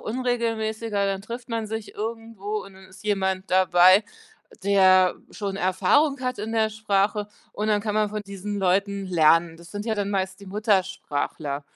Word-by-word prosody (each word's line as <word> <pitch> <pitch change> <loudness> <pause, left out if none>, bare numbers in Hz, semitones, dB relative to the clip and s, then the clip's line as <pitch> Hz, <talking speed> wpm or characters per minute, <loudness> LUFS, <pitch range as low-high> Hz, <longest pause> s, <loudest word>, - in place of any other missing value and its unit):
unregelmäßiger. 225 -3 -1
Dann 195 -1 -1
trifft 235 +3 -8
man 225 -1 -2
sich 220 0 -6
irgendwo 215 -2 -5
und 195 - -13
dann 190 0 -15
ist 190 +2 -16
jemand 190 -2 -1
dabei, 185 +2 +6 0.6
der 185 -2 +5
schon 200 -2 -4
Erfahrung 275 - +2
hat 255 -2 -2
in 220 +2 -4
der 220 -1 +2
Sprache 210 -1 0 0.2
und 210 - -3
dann 205 -1 +2
kann 210 -2 -2
man 215 -1 +2
von 210 0 -4
diesen 200 +1 -5
Leuten 195 +1 +1
lernen. 165 -1 +3
Das 170 0 -14
sind 205 +1 -5
ja 225 - 0
dann 205 -1 -2
meist 190 -1 -2
die 200 - -12
Muttersprachler. 185 -8 -1
200 Hz, 170 wpm, -24 LUFS, 190-220 Hz, 0.6 s, dabei